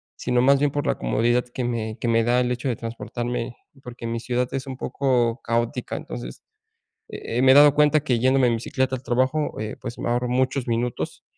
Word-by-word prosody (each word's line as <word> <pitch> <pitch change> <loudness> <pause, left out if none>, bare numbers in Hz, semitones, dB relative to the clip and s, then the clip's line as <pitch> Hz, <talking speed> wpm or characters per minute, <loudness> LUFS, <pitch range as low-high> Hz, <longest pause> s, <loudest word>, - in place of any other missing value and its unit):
sino 125 0 0
más 140 +1 +5
bien 145 +1 +2
por 145 +1 -2
la - - 0
comodidad 120 - +1
que 125 - -3
me 115 -2 -3
que 120 - -3
me 115 0 +3
da 120 +2 +2
el 125 - 0
hecho 125 +2 -3
de 120 - 0
transportarme, 120 +1 -5 0.3
porque 120 -2 -9
mi 115 0 -2
ciudad 125 +1 -1
es 135 0 -4
un 130 - -6
poco 125 -4 0
caótica. 115 0 -2
Entonces, - - -7 0.7
eh, 115 - -5
eh, 125 - +2
me 130 - +6
he 130 - +8
dado 145 0 +8
cuenta 150 0 +3
que 120 -3 +1
yéndome 130 +1 +3
en 120 - +2
bicicleta 130 +3 -1
al 130 - -5
trabajo, 130 +5 0
eh, 110 0 -4
pues, 120 -2 -7
ahorro 120 +1 -1
muchos 130 0 0
minutos 120 +1 -2
125 Hz, 210 wpm, -23 LUFS, 115-130 Hz, 0.7 s, he